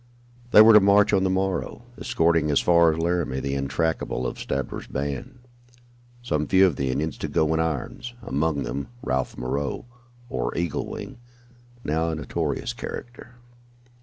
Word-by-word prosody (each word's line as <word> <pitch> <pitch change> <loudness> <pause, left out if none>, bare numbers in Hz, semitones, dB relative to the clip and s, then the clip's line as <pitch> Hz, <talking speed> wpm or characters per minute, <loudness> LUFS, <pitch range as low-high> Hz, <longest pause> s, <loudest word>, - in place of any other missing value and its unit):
They 110 -2 +9
were 110 +1 +8
to 105 - +10
march 100 +1 +4
on 95 -1 +3
the 95 - +2
morrow, 95 +4 -2
escorting 80 -2 +1
as 70 - +3
far 85 -1 +5
as 80 - -3
Laramie 85 -5 0
the 70 0 -3
intractables 70 -1 -1
of - - -4
Stabber's 70 0 -4
band, 70 - -4 0.9
some 75 -10 -1
few 95 +3 +5
of 90 -6 +1
the 65 0 -2
Indians 75 +5 -2
to - - -3
go 80 0 +1
in 80 - 0
irons, 80 - -3
among 70 +1 -1
them 70 - -4 0.2
Ralph 65 0 -2
Moreau, 70 - -3 0.4
or - - -3
Eagle 85 -2 -2
Wing, 130 -3 -8 0.6
now 80 +2 0
a 80 - -2
notorious 75 -3 -3
character. 120 0 -8
80 Hz, 160 wpm, -24 LUFS, 70-95 Hz, 0.9 s, to